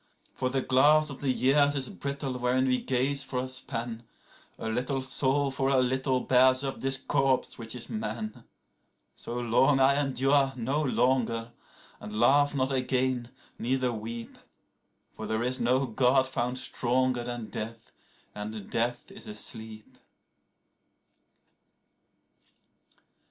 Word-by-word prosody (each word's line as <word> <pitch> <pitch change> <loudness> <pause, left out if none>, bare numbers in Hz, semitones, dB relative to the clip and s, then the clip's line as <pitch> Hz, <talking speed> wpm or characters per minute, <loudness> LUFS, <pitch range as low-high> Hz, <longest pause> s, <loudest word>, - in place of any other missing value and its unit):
107For 130 -1 0
the 135 0 +1
glass 150 +4 +4
of 135 - -9
the 140 - 0
years 140 +3 +3
is 135 -2 +2
brittle 140 -2 -4
wherein 125 +1 +1
we 125 -1 +2
gaze 135 +2 0
for 130 - -5
a 125 +1 -1
span;108A 115 -3 -7
little 130 +3 -1
soul 135 +1 +1
for 135 0 0
a 135 - +3
little 130 0 +1
bears 130 +1 +4
up 135 -1 -4
this 135 0 +1
corpse 135 -3 0
which 115 +1 -1
is 120 - -6
man.109So 120 - -8
long 135 +4 +4
I 140 +2 +4
endure, 135 0 +2
no 130 +5 -1
longer; 120 -4 0 0.5
and 105 +1 -6
laugh 145 +3 +4
not 130 0 0
again, 130 -2 0 0.3
neither 125 0 0
weep.110For 115 -1 -10
there 110 +1 -1
is 130 +1 0
no 125 +3 +2
God 130 +2 +2
found 125 0 -2
stronger 125 0 0
than 120 -2 -5
death; 115 +1 -6 0.4
and 105 -1 -7
death 120 +9 -2
is 200 +2 -7
a 210 - -6
sleep. 110 - -6
130 Hz, 130 wpm, -28 LUFS, 120-135 Hz, 0.5 s, glass